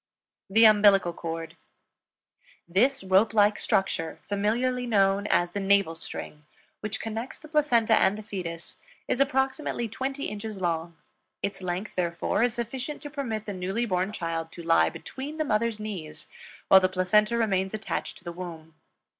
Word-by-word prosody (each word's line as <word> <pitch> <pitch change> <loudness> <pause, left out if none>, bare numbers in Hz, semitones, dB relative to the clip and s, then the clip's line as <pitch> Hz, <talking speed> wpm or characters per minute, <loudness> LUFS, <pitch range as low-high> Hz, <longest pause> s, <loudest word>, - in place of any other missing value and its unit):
THE 225 +3 +6
UMBILICAL 205 -4 +6
CORD. 165 -1 -6 1.1
This 230 +8 +2
rope 190 +4 +3
like 210 0 +4
structure, 165 -4 0
familiarly 240 +5 0
known 200 -2 +2
as 175 -3 +2
the 200 - -3
navel 200 -3 +3
string, 150 -2 -8 0.4
which 210 +1 -4
connects 225 +3 -5
the 310 - -13
placenta 265 -8 +3
and 205 -1 +4
the 215 - -8
fetus, 170 -5 -6 0.3
is - - 0
approximately 265 -2 0
twenty 265 +5 -4
inches 210 -1 -5
long; 170 -2 -2 0.5
its 200 - -3
length, 185 +3 -3
therefore, 175 +3 -1
is 240 0 +2
sufficient 260 +5 -4
to 290 - -7
permit 230 -7 -3
the 205 - -4
newly 190 +6 -2
born 185 -1 0
child 165 -4 -4
to 170 - -8
lie 165 0 +4
between 285 +4 -7
the 310 - 0
mother's 225 -2 0
knees 195 -8 -7 0.4
while 190 - +9
the 185 0 +2
placenta 210 +5 +2
remains 195 -3 0
attached 215 -1 -4
to - - -17
the 170 - -5
womb. 165 -2 -8
205 Hz, 155 wpm, -27 LUFS, 180-230 Hz, 1.1 s, while